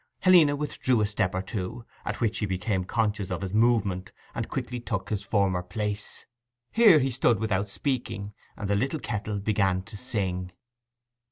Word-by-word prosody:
Helena 170 -6 +6
withdrew 135 -4 0
a - - +3
step 105 -3 0
or 95 - -1
two, 100 +4 -5 0.2
at - - -3
which 110 -2 0
he 105 - 0
became 95 0 -1
conscious 105 -3 0
of 90 +1 -3
his 95 0 -4
movement, 105 -5 +2 0.2
and - - -3
quickly 125 0 -3
took 110 -5 -4
his 105 -2 0
former 100 -3 +1
place. 105 +3 -4 0.5
Here 220 -8 +7
he 135 -2 +1
stood 120 -2 +3
without 105 -2 0
speaking, 105 -4 -2 0.2
and 105 - -4
the 100 - +2
little 135 +9 0
kettle 105 -4 -3
began 100 -3 +1
to 105 +2 -11
sing. 95 -6 -3
105 Hz, 170 wpm, -27 LUFS, 95-120 Hz, 0.5 s, Here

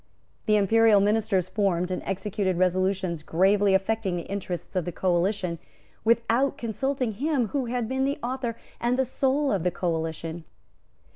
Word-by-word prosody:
The 215 - +4
Imperial 215 +1 +5
ministers 205 -2 +1
formed 185 -3 0
and 185 - -2
executed 195 -1 -1
resolutions 185 -1 0
gravely 195 +5 +3
affecting 195 -1 0
the 170 - -3
interests 190 -2 -5
of 185 - +1
the 175 - -3
coalition 180 0 0 0.4
without 235 +4 +2
consulting 255 +2 -2
him 255 +1 0
who 275 +1 -1
had 240 -1 -2
been 265 +2 -1
the 280 +1 -1
author 245 -1 -2 0.2
and 240 +1 +1
the 265 - +2
soul 275 +3 +1
of 190 -5 0
the 180 - +2
coalition. 165 -1 -3
200 Hz, 150 wpm, -26 LUFS, 180-235 Hz, 0.4 s, Imperial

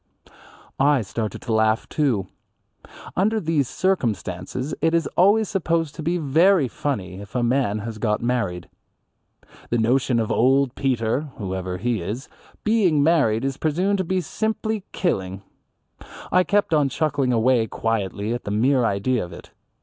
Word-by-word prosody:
I 140 -2 +3
started 105 +2 -4
to 115 - -2
laugh, 110 0 +2
too. 125 -11 0 0.9
Under 215 +4 +2
these 155 - 0
circumstances 125 - -2
it 165 +1 +2
is 165 - +2
always 205 +4 +4
supposed 165 -5 -1
to 165 - -7
be 170 +3 0
very 165 +1 +3
funny 100 -9 -4
if 100 +2 -12
a 125 - +1
man 120 -3 +1
has 110 -2 -6
got 105 -1 0
married. 115 -8 -2 1.0
The 120 - +1
notion 120 +1 +2
of 110 - -1
old 135 +1 +3
Peter 130 +2 -1
(whoever 95 -2 -4
he 115 +1 -1
is) 110 +10 -5 0.4
being 195 -10 +3
married 140 -8 +2
is 135 0 -2
presumed 180 +7 0
to - - +1
be 185 +1 0
simply 220 +3 -2
killing. 95 - -2 0.9
I 180 0 +4
kept 205 -4 +1
on 145 -3 +3
chuckling 140 -1 0
away 120 0 +3
quietly 110 -1 -2
at 120 - -4
the - - -5
mere 125 +5 +2
idea 115 +3 0
of 90 - -8
it. - - -12
130 Hz, 150 wpm, -23 LUFS, 110-165 Hz, 1.0 s, always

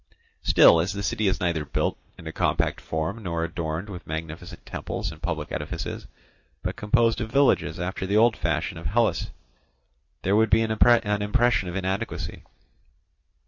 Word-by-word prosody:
Still, 85 - +6
as 95 +4 -2
the 100 0 -4
city 110 +1 0
is 95 - +1
neither 85 -3 0
built 70 - -1 0.2
in - - -12
a - - -4
compact - - 0
form 80 +8 -3
nor 85 -4 -2
adorned 85 +2 -3
with 90 -4 -9
magnificent 80 +2 -6
temples - - -4
and - - -13
public - - -3
edifices, - - -5 0.6
but - - -2
composed 115 +2 +2
of 110 0 -4
villages 140 -7 +2
after 95 +1 -3
the 100 +2 +2
old 115 +1 +5
fashion - - -2
of 80 - -4
Hellas, 115 +6 +1 0.9
there 95 +2 +2
would 110 0 +4
be 115 +1 +4
an 110 - -2
impression 110 -2 +3
of 85 - -6
inadequacy. 95 0 -3
100 Hz, 160 wpm, -25 LUFS, 85-110 Hz, 0.9 s, Still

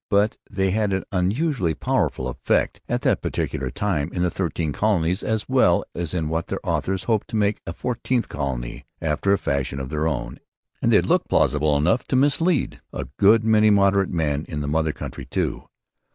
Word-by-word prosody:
But 100 +2 +2
they 95 -1 0
had 105 -1 0
an 95 - -1
unusually 95 - 0
powerful 65 - 0
effect 65 - 0
at - - -1
that - - +2
particular 65 - -2
time 80 -1 -1
in 90 - -1
the 90 - +1
Thirteen 85 -4 -2
Colonies 90 -2 +1
as 110 -1 -1
well 125 -10 +3
as 85 0 -3
in 80 -3 -1
what 80 +1 -2
their - - -3
authors 95 0 -1
hoped 110 -3 0
to - - -6
make 105 -1 +1
a 85 - -3
Fourteenth 120 +3 -1
Colony 65 -4 -4
after 80 +4 0
a 100 - +4
fashion 70 -3 -2
of 65 -1 -5
their 75 +1 -1
own; 65 -6 -3 0.4
and - - +2
they - - +6
looked - - +1
plausible 75 +1 +2
enough 90 - +2
to - - 0
mislead 145 +4 +2
a 65 -2 -5
good 105 +3 +5
many 110 -1 +4
moderate 100 -1 +3
men 75 -3 -1
in 75 -4 -3
the 70 - -3
mother 80 +1 +1
country 70 -2 -7
too. - - -2
90 Hz, 190 wpm, -23 LUFS, 75-105 Hz, 0.4 s, they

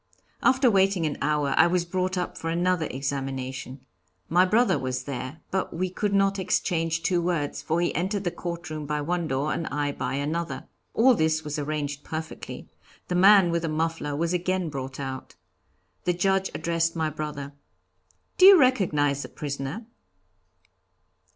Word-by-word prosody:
After 260 -2 +4
waiting 190 -3 +3
an 150 - -1
hour 150 -2 +1
I - - +7
was 175 0 +1
brought 185 +1 -1
up 180 - -3
for 165 - -4
another 175 -1 +1
examination. 135 -1 -4 0.4
My 180 +3 +5
brother 225 - +3
was 130 0 -3
there. 135 +2 -6
But 190 -3 -2
we 185 +1 -1
could 205 +2 -1
not 195 0 +2
exchange 165 -3 0
two 175 -2 +2
words, 165 -5 -1
for 155 +3 0
he 175 - 0
entered 190 +5 -1
the 175 - -1
courtroom 165 -4 -5
by 150 0 -1
one 170 +2 -1
door 140 +2 -1
and 165 - -3
I 145 0 -1
by 140 - -3
another. 150 0 -3 0.3
All 255 +3 +6
this 160 -5 +1
was 150 0 -4
arranged 145 -1 -3
perfectly. 160 0 -6 0.4
The - - -1
man 190 0 +6
with 170 0 0
the 165 - -2
muffler 155 -2 -2
was 170 +3 0
again 180 -1 0
brought 135 -2 -6
out. 130 -1 -6 0.7
The 180 - +2
Judge 190 +2 +1
addressed 165 0 0
my 160 -1 -1
brother. 145 -2 -5 0.9
'Do 370 - +9
you 390 -2 +10
recognize 155 - +2
the - - -7
prisoner?' 145 - -5
165 Hz, 165 wpm, -26 LUFS, 145-180 Hz, 0.9 s, you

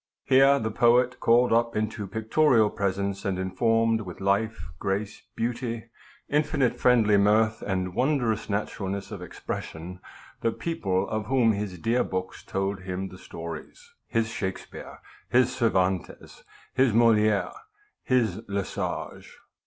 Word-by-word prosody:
Here 135 +1 +5
the 110 -4 -2
poet 120 +3 +3
called 120 +1 +4
up 115 0 +2
into 105 -1 -2
pictorial 110 +2 +3
presence, 100 0 -2
and 95 -3 -1
informed 115 +4 +1
with 90 -4 -8
life, 100 -1 0
grace, 100 +2 -2
beauty, 115 -1 -3 0.4
infinite 145 -3 +1
friendly 115 -5 +4
mirth 110 +2 +3
and 95 -2 -2
wondrous 125 -3 0
naturalness 100 -1 -3
of 100 -4 -7
expression, 90 0 -6 0.4
the 115 - +1
people 100 - -1
of 110 -1 -3
whom 125 -4 +3
his 100 -3 -3
dear 115 +8 +1
books 95 0 -5
told 95 0 -2
him 95 +1 -4
the 95 - -12
stories, 90 - -9
his 115 -1 0
Shakspeare, 95 -4 -6 0.3
his 125 0 +3
Cervantes, 95 - -1 0.3
his 130 -3 +3
Moliere, 110 -3 +3 0.5
his 110 -6 +1
Le 100 -1 -2
Sage. - - -5
110 Hz, 130 wpm, -26 LUFS, 95-120 Hz, 0.5 s, Here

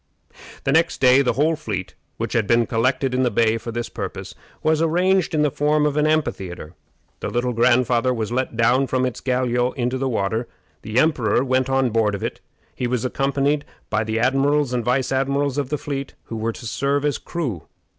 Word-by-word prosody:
The - - +1
next 165 +1 +2
day 130 +1 +6
the 125 - +1
whole 155 +6 +2
fleet, 100 -9 -5 0.2
which - - -3
had 110 -3 +1
been 115 0 +3
collected 130 +3 0
in 130 - +1
the 125 - +3
bay 115 0 +2
for 115 - -6
this 120 +1 -3
purpose, - - -6 0.3
was 155 0 +2
arranged 180 +2 +2
in 150 - +3
the 150 - +2
form 150 +1 +1
of 145 -1 0
an 150 0 +2
amphitheatre. 95 - -2 0.5
The - - -3
Little 120 +1 -1
Grandfather 120 +1 +3
was 115 -3 -2
let 125 -2 -2
down 125 +4 +3
from 130 0 0
his 125 -2 -2
galliot 125 -1 0
into 125 +1 -1
the 135 0 0
water. 110 +1 -1 0.3
The 110 +2 -4
emperor 130 -6 +3
went 130 0 +1
on 135 -2 +2
board 105 -2 +1
of 100 - -6
it. - - -4 0.3
He 125 - -2
was 125 0 -1
accompanied 140 +2 0 0.3
by - - +1
the 110 +1 -2
admirals 135 +2 +2
and 120 -1 0
vice 130 +2 0
admirals 140 +1 0
of 140 -3 -2
the 150 - -1
fleet, 140 -1 -5
who 115 - -7
were 115 +1 -2
to 120 - -10
serve 140 +5 0
as 145 - 0
crew. 130 - -4
130 Hz, 205 wpm, -22 LUFS, 115-140 Hz, 0.5 s, day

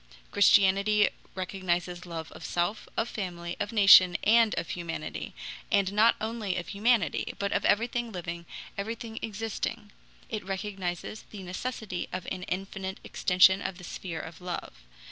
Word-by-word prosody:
Christianity 200 +1 +5 0.3
recognizes 180 -1 -2
love 165 -2 -6
of - - -11
self, 175 +5 -1
of 225 - +1
family, 175 -5 -5
of 205 - -2
nation, 195 -4 +8
and 225 +1 +5
of 165 - -3
humanity, 170 -2 -5 0.4
and 200 -2 +2
not 220 +3 +5
only 220 -3 -2
of 175 - -4
humanity, 210 - +1
but 200 0 -1
of - - +1
everything 235 +2 +1
living, 170 -2 -6 0.3
everything 225 +2 -5
existing; 220 0 -4 0.4
it 215 -2 -4
recognizes 195 0 -4
the 200 -3 -8
necessity 185 0 -4
of 185 -1 -4
an 185 - -3
infinite 190 0 -4
extension 190 +1 +4
of 185 - -4
the 180 - -12
sphere 170 -1 -5
of 165 +2 -9
love. 180 -1 -5
195 Hz, 145 wpm, -29 LUFS, 180-215 Hz, 0.4 s, nation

